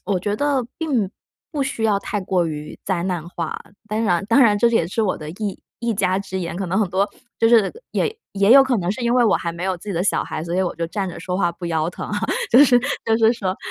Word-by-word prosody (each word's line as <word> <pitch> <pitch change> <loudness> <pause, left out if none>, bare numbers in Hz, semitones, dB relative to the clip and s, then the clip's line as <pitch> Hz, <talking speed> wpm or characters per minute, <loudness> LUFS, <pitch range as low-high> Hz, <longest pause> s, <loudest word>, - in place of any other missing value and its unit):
我 195 -2 +1
觉 205 +3 -1
得 280 -2 0
并 260 - 0 0.4
不 290 -3 0
需 265 -4 -3
要 205 -2 +3
太 205 0 -3
过 185 -2 0
于 150 -1 -6
灾 185 -3 -1
难 175 -3 -3
化。 165 -3 -4 0.3
当 215 +1 -1
然 180 -4 +1
当 230 +6 +4
然 210 -4 +4
这 235 - +4
也 225 -8 +2
是 225 +5 -1
我 200 - 0
的 155 0 -7
一 200 +3 -5 0.2
一 235 -1 -1
家 190 -1 +1
之 190 -1 -5
言， 170 -1 -4
可 195 - -3
能 190 +4 0
很 205 - +1
多 195 +2 +1 0.3
就 225 - +4
是 225 -4 +4 0.2
也 440 - 0 0.2
也 200 +2 +4
有 275 +1 +9
可 260 -2 +1
能 175 0 -1
是 225 - -7
因 235 0 +2
为 250 -1 +4
我 210 -4 +4
还 170 - -3
没 170 +1 -7
有 190 -1 0
自 175 - -12
己 - - -1
的 170 - 0
小 200 - +1
孩， 155 - -5
所 170 0 -3
以 - - +2
我 180 - -2
就 170 - -2
站 190 +2 -2
着 170 - -8
说 180 +1 -3
话 175 -3 +1
不 175 - -10
腰 160 -1 0
疼 - - -7
啊， 210 - -2 0.3
就 260 +5 +8
是 250 -3 +5 0.3
就 225 - +3
是 225 0 +5
说 195 -5 -3
200 Hz, 295 characters per minute, -21 LUFS, 175-225 Hz, 0.4 s, 有